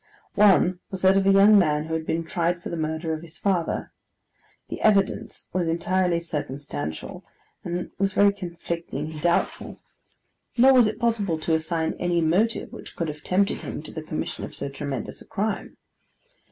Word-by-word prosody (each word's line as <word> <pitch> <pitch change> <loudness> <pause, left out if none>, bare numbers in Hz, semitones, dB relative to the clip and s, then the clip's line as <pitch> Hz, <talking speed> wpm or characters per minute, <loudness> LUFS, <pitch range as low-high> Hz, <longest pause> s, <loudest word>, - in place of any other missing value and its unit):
One 190 -3 +4
was 190 -1 -6
that 190 0 +6
of 195 0 +3
a - - +7
young 200 +2 +7
man, 150 -4 +1
who 160 - -5
had 160 -1 -2
been 165 +1 0
tried 170 +1 -1
for - - -5
the - - -3
murder 160 0 -2
of 155 - -4
his 165 -1 -11
father. 185 -5 -1 0.8
The - - -6
evidence 200 -3 +1
was 180 -2 0
entirely 175 +1 +1
circumstantial, 135 - -5 0.4
and 175 +1 -4
was 195 0 +1
very 200 +1 +5
conflicting 170 -5 -5
and 155 -1 -8
doubtful; 175 +1 0 0.8
nor 265 +3 +7
was 245 -4 +6
it 215 0 -3
possible 220 -7 0
to 160 - 0
assign 160 0 0
any 175 -1 +1
motive 185 +8 +1
which - - -10
could 165 -2 -2
have 150 0 -7
tempted 195 +2 +1
him - - -6
to - - -9
the - - -6
commission - - -4
of - - -7
so - - -4
tremendous 140 -3 -5
a - - -14
crime. 205 +1 -3
170 Hz, 180 wpm, -25 LUFS, 160-195 Hz, 0.8 s, a